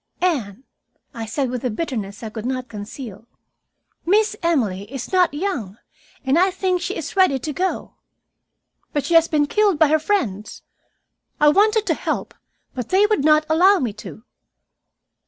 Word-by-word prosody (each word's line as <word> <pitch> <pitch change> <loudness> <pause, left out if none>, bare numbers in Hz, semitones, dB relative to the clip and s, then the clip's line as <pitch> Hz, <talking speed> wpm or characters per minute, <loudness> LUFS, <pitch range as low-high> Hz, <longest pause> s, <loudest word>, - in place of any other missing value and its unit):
"Anne," 255 - -1 0.5
I 225 -3 -6
said 255 +3 -2
with 250 -2 -4
a 250 - 0
bitterness 215 -6 -4
I 220 - -6
could 220 +1 -5
not 255 -1 -3
conceal, 215 0 -9 0.8
"Miss 420 +4 +2
Emily 220 - -1
is 270 -3 -6
not 365 -1 +4
young, 290 - -4 0.5
and 270 +5 +3
I 375 +2 +4
think 370 -1 -1
she 370 +3 -3
is 320 - -6
ready 375 -8 +4
to 295 +4 -5
go. 370 +6 -2 1.0
But 290 -2 -1
she 335 - -1
has 330 0 +6
been 300 -3 +2
killed 410 +2 +2
by 310 -1 +4
her 310 +1 +3
friends. 245 - -2 0.8
I 295 - +6
wanted 430 +6 +3
to - - +1
help, - - -3 0.4
but 250 -3 -5
they 385 +2 +4
would 420 -9 +1
not 305 0 +4
allow 365 +6 +5
me 245 - -2
to." 220 - -10
295 Hz, 165 wpm, -21 LUFS, 235-365 Hz, 1.0 s, has